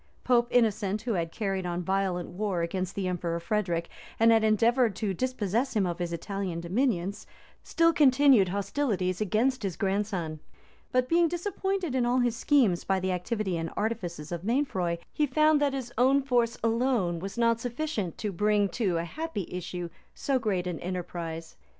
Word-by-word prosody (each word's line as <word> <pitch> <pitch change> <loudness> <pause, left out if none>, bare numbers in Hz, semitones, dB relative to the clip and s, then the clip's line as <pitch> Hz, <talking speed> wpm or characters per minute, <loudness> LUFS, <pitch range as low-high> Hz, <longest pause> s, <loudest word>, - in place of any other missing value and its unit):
Pope 240 -2 +3
Innocent, 215 -3 +1
who 235 -2 -1
had 165 -3 -1
carried 195 -2 -2
on 175 0 -3
violent 190 -1 -1
war 185 -2 -2
against 185 +2 -3
the 195 -2 -2
emperor 170 -2 -2
Frederic, 170 -2 -1 0.3
and 225 +1 +6
had 225 -1 +4
endeavored 225 +1 +3
to 205 -1 -2
dispossess 245 +2 -1
him 205 -3 +2
of 175 -1 -3
his 175 -1 -2
Italian 185 0 -3
dominions, 195 +1 -1 0.3
still 330 0 +2
continued 265 - +5
hostilities 200 -2 -1
against 230 +6 +1
his 195 -5 -3
grandson; 190 -6 -1 0.5
but 255 0 +2
being 335 +2 +4
disappointed 380 -1 -2
in 260 -2 +1
all 240 +1 +2
his 245 -2 +2
schemes 235 -8 +2
by 195 -1 +1
the 185 0 -1
activity 185 0 -2
and 165 0 -3
artifices 180 -9 -3
of 170 -1 -3
Mainfroy, 195 -8 0 0.2
he 300 - +1
found 305 +2 +3
that 285 -2 +2
his 245 -3 -5
own 270 +2 +4
force 240 -3 +1
alone 230 -7 +1
was 195 +5 -6
not 230 -1 +3
sufficient 240 - -3
to 210 - -3
bring 205 +2 +2
to 190 -7 0
a 165 - -1
happy 310 - -4
issue 180 -1 -4 0.3
so 270 -2 0
great 200 -6 -1
an 180 -2 -3
enterprise. 170 -2 -5
210 Hz, 170 wpm, -28 LUFS, 180-250 Hz, 0.5 s, and